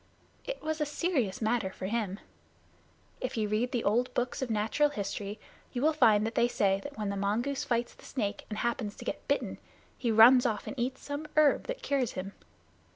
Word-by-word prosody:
It -, -, -5 dB
was 315 Hz, 0 st, -2 dB
a -, -, +3 dB
serious 285 Hz, -, -1 dB
matter 220 Hz, -3 st, +1 dB
for 190 Hz, -, -7 dB
him. 205 Hz, -2 st, -2 dB, 1.0 s
If 255 Hz, -1 st, -3 dB
you 215 Hz, -1 st, +1 dB
read 220 Hz, +4 st, 0 dB
the 240 Hz, -3 st, -1 dB
old 245 Hz, +5 st, +2 dB
books 245 Hz, +2 st, -1 dB
of 260 Hz, -, -2 dB
natural 225 Hz, +7 st, +2 dB
history, 205 Hz, -3 st, -4 dB, 0.3 s
you 245 Hz, 0 st, -2 dB
will 315 Hz, +1 st, +4 dB
find 215 Hz, -8 st, +5 dB
they 225 Hz, +1 st, +2 dB
say 195 Hz, -4 st, +2 dB
that 285 Hz, -3 st, -8 dB
when 210 Hz, -2 st, -2 dB
the 200 Hz, -, -2 dB
mongoose 220 Hz, +8 st, -1 dB
fights 240 Hz, 0 st, 0 dB
the -, -, -19 dB
snake 210 Hz, -6 st, -3 dB
and 210 Hz, -, -4 dB
happens 235 Hz, -2 st, -2 dB
to -, -, -10 dB
get -, -, -4 dB
bitten, -, -, -1 dB, 0.4 s
he 240 Hz, -, -2 dB
runs 235 Hz, +3 st, +8 dB
off 215 Hz, -4 st, -1 dB
and -, -, -5 dB
eats 255 Hz, +2 st, -2 dB
some 290 Hz, +1 st, -4 dB
herb 300 Hz, -2 st, +5 dB
that -, -, -5 dB
cures 270 Hz, -5 st, 0 dB
him. 195 Hz, +2 st, -5 dB
235 Hz, 200 wpm, -30 LUFS, 210-270 Hz, 1.0 s, runs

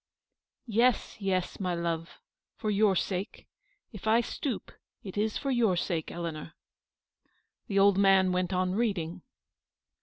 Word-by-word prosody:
" -, -, -64 dB, 0.2 s
Yes, 235 Hz, 0 st, +2 dB
yes, 185 Hz, -2 st, -1 dB
my 180 Hz, -3 st, -1 dB
love, 170 Hz, -1 st, -3 dB, 0.4 s
for 215 Hz, -, -2 dB
your 205 Hz, -1 st, +3 dB
sake; 185 Hz, +2 st, -3 dB, 0.5 s
if 210 Hz, -2 st, -8 dB
I 225 Hz, +2 st, +5 dB
stoop, 245 Hz, 0 st, -4 dB, 0.3 s
it 190 Hz, -, -8 dB
is 215 Hz, +1 st, 0 dB
for 275 Hz, -, -2 dB
your 225 Hz, -8 st, +2 dB
sake, 170 Hz, -2 st, -2 dB
Eleanor." 165 Hz, -2 st, -6 dB, 1.1 s
The 200 Hz, -, -1 dB
old 200 Hz, 0 st, +5 dB
man 195 Hz, -1 st, +5 dB
went 180 Hz, 0 st, 0 dB
on 185 Hz, 0 st, 0 dB
reading. 190 Hz, -6 st, -1 dB
195 Hz, 140 wpm, -29 LUFS, 180-215 Hz, 1.1 s, I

